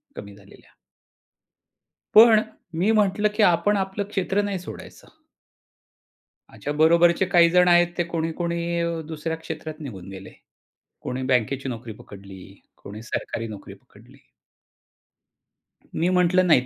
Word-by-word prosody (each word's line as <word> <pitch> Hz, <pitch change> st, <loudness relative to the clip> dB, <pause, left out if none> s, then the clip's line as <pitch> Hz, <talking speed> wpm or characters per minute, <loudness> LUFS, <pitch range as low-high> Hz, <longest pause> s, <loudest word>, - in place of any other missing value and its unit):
कमी 100 Hz, 0 st, -10 dB
झालेल्या. 100 Hz, -1 st, -19 dB, 1.4 s
पण 220 Hz, -1 st, +8 dB, 0.3 s
मी 185 Hz, +7 st, +1 dB
म्हंटलं, 210 Hz, -1 st, +2 dB
की 215 Hz, -, +2 dB
आपण 205 Hz, +4 st, +3 dB
आपलं 195 Hz, +1 st, -3 dB
क्षेत्र 195 Hz, 0 st, -1 dB
नाही 200 Hz, -2 st, -3 dB
सोडायचं. 315 Hz, -, -12 dB, 1.3 s
माझ्या 145 Hz, -, -6 dB
बरोबरचे 170 Hz, +4 st, +4 dB
काही 170 Hz, -1 st, +5 dB
जण 180 Hz, +1 st, +4 dB
आहेत, 175 Hz, 0 st, +5 dB
ते 175 Hz, -, +1 dB
कोणी, 165 Hz, -1 st, -3 dB
कोणी 170 Hz, -1 st, -2 dB
दुसऱ्या 160 Hz, +1 st, -4 dB
क्षेत्रात 160 Hz, -1 st, -8 dB
निघून 100 Hz, -, -9 dB
गेले. 95 Hz, 0 st, -10 dB, 0.7 s
कोणी 130 Hz, +1 st, -4 dB
बँकेची 130 Hz, +1 st, -1 dB
नोकरी 115 Hz, -2 st, -7 dB
पकडली, 100 Hz, -2 st, -13 dB, 0.3 s
कोणी 105 Hz, +2 st, -9 dB
सरकारी 115 Hz, 0 st, -4 dB
नोकरी 105 Hz, -2 st, -10 dB
पकडली. -, -, -21 dB, 1.8 s
मी 170 Hz, +3 st, +1 dB
म्हंटलं 180 Hz, 0 st, +2 dB
नाही 130 Hz, -7 st, +4 dB
170 Hz, 125 wpm, -23 LUFS, 130-185 Hz, 1.8 s, पण